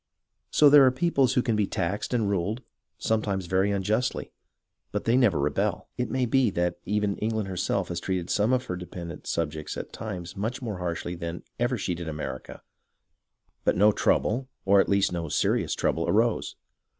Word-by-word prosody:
So 150 - +5
there 145 -1 +8
are 130 - +7
peoples 135 -1 +2
who 125 - +3
can 115 - +1
be 105 -2 +1
taxed 95 +3 -2
and 115 -4 +1
ruled, 100 +5 -1 0.3
sometimes 100 -4 -1
very 95 +3 +2
unjustly, 105 +5 -1 0.6
but - - -2
they 115 - +2
never 120 - +4
rebel. 75 +1 -1
It 125 +1 -2
may 130 -1 +1
be 125 0 +3
that 85 -2 -1
even 105 0 0
England 110 -1 -1
herself 95 0 -1
has 85 -1 -2
treated 90 -1 -2
some 105 +4 +2
of 130 0 +1
her 90 - -3
dependent 85 -2 -8
subjects 75 -2 -3
at - - -7
times 90 -6 -6
much 110 +6 -3
more 110 -7 -5
harshly 85 0 -3
than 85 0 -5 0.2
ever 120 +1 +1
she 95 -3 -2
did 85 -1 -6
America, 75 -4 -6 1.0
but - - +2
no 105 +3 +6
trouble, 120 +4 +1 0.2
or 100 0 +5
at - - -2
least 100 -1 +3
no 85 -2 -3
serious - - +1
trouble, - - 0
arose. - - +1
100 Hz, 180 wpm, -27 LUFS, 90-115 Hz, 1.0 s, there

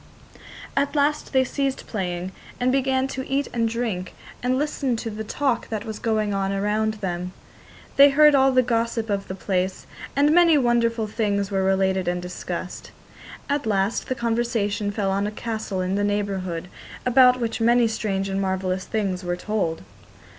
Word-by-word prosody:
At 280 +1 0
last 295 +1 +1
they 260 -1 +4
ceased 270 +1 -2
playing, 180 -3 -3 0.3
and 250 +1 +2
began 265 0 +1
to 260 -1 -5
eat 275 +1 0
and 230 -1 +1
drink 220 -6 -3 0.3
and 250 +1 +1
listen 280 -3 -1
to 225 0 -4
the 215 +1 -5
talk 260 +3 -1
that 220 -1 -4
was 220 -2 -6
going 215 -2 0
on 195 0 0
around 210 +2 0
them. 180 -3 -4 0.6
They 280 +1 +9
heard 300 +1 +6
all 270 -1 +5
the 255 -1 +4
gossip 230 -2 -1
of 200 -1 -2
the 190 - -5
place, 190 -1 -2 0.3
and 290 +2 +4
many 335 -2 +6
wonderful 235 -3 +2
things 205 -2 -1
were 195 -1 +1
related 190 -1 +1
and 180 0 0
discussed. 180 0 -6 0.6
At 285 -4 -1
last 200 0 0
the 260 - 0
conversation 225 -3 -1
fell 200 -1 -1
on 200 +1 0
a - - -3
castle 215 -3 -4
in 185 +1 -1
the 205 +1 0
neighbourhood, 195 -4 -2 0.4
about 250 0 +6
which 230 -1 -2
many 235 +1 +4
strange 200 -3 -2
and 195 0 -1
marvellous 190 -1 -1
things 195 -4 -2
were 175 0 -2
told. 180 - -2
220 Hz, 170 wpm, -24 LUFS, 195-250 Hz, 0.6 s, They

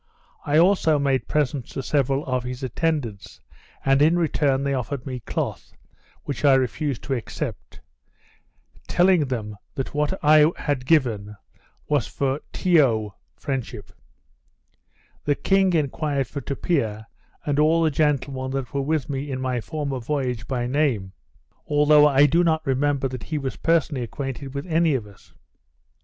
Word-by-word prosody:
I 145 +1 +3
also 170 -3 +4
made 140 -2 0
presents 145 -4 -1
to 135 - -4
several 140 +1 0
of 130 -2 -1
his 125 +1 -6
attendants; 130 -5 -2 0.5
and, 135 +1 +4
in 160 +4 +4
return, 145 -5 +1
they 140 0 0
offered 130 0 -3
me 130 -2 -5
cloth, 110 - -4 0.5
which 140 -1 -5
I 140 -2 +6
refused 130 +1 -1
to 135 - -2
accept; 120 -4 -5 1.1
telling 175 -4 +3
them 105 -5 -4 0.2
that 135 - -4
what 150 +5 0
I 155 +1 +6
had 130 -4 -2
given 110 -10 +1 0.5
was 145 -5 +1
for 135 0 -1
tiyo 130 - +2 0.2
(friendship). 120 - -5 1.3
The 145 - +2
king 190 +4 +2
enquired 145 -2 0
for 140 +5 -6
Tupia, 115 -8 -2 0.4
and 145 -1 0
all 160 +2 +4
the 160 - +2
gentlemen 140 -3 0
that 135 +1 -5
were 140 - 0
with 150 -1 -1
me 140 0 -4
in 130 -1 -3
my 130 -2 -1
former 145 -1 -4
voyage, 125 -3 -3
by 125 -3 -2
name; 125 -8 0 0.6
although 150 0 +5
I 140 0 +5
do 165 +5 +3
not 160 -2 +1
remember 135 +1 +1
that 130 -2 -6
he 155 - -3
was 135 -2 -3
personally 160 -5 +1
acquainted 135 +3 -5
with 140 - -4
any 165 -3 +2
of 115 -5 -3
us. 100 -2 -19
140 Hz, 150 wpm, -23 LUFS, 130-150 Hz, 1.3 s, I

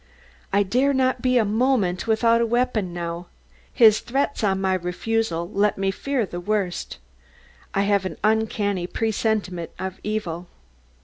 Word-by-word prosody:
I 200 +1 +3
dare 255 +8 +2
not 260 0 +1
be 255 -1 +3
a 225 - +3
moment 215 -4 +1
without 230 +1 +3
a - - +3
weapon 235 -5 0
now 170 0 -5 0.4
his 220 -4 +6
threats 275 +1 -1
on 190 -2 +2
my 190 -1 +1
refusal 180 0 -1
let 200 +1 +1
me 195 0 0
fear 265 +3 -1
the 175 -1 -6
worst. 195 -1 -2 0.8
I 195 - +3
have 200 -1 +2
an 185 - -4
uncanny 210 -4 +1
presentiment 210 -5 -1
of 190 0 -5
evil. 180 -5 -3
210 Hz, 145 wpm, -23 LUFS, 185-230 Hz, 0.8 s, his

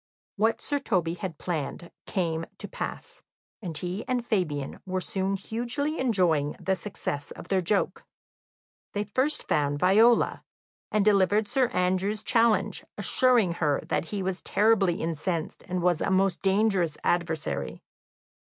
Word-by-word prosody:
What 220 +2 +1
Sir 290 -1 0
Toby 170 - 0
had 175 -2 -5
planned 170 0 -4 0.2
came 165 -4 -1
to - - -7
pass, - - -6 0.4
and 170 -6 -4
he 180 +6 -4
and 250 -2 -1
Fabian 155 - -1
were 185 -1 -2
soon 190 0 -1
hugely 245 - -2
enjoying 175 - +2
the 190 - 0
success 170 -6 -4
of - - -10
their 190 -1 +2
joke. 195 +4 0 0.9
They 205 - 0
first 260 +9 0
found 145 -1 +1
Viola, 215 +8 +4 0.5
and 210 -1 +2
delivered 205 +1 +4
Sir 260 +2 +2
Andrew's 185 +2 0
challenge, 230 -2 +2
assuring 245 -8 +3
her 145 -3 +2
that - - 0
he 195 +3 -4
was 185 0 -2
terribly 205 -4 +3
incensed, 165 +1 -2
and 180 -1 -2
was 175 -3 +2
a - - 0
most 190 0 +2
dangerous 195 -5 +2
adversary. 170 -3 -1
190 Hz, 140 wpm, -27 LUFS, 170-215 Hz, 0.9 s, Viola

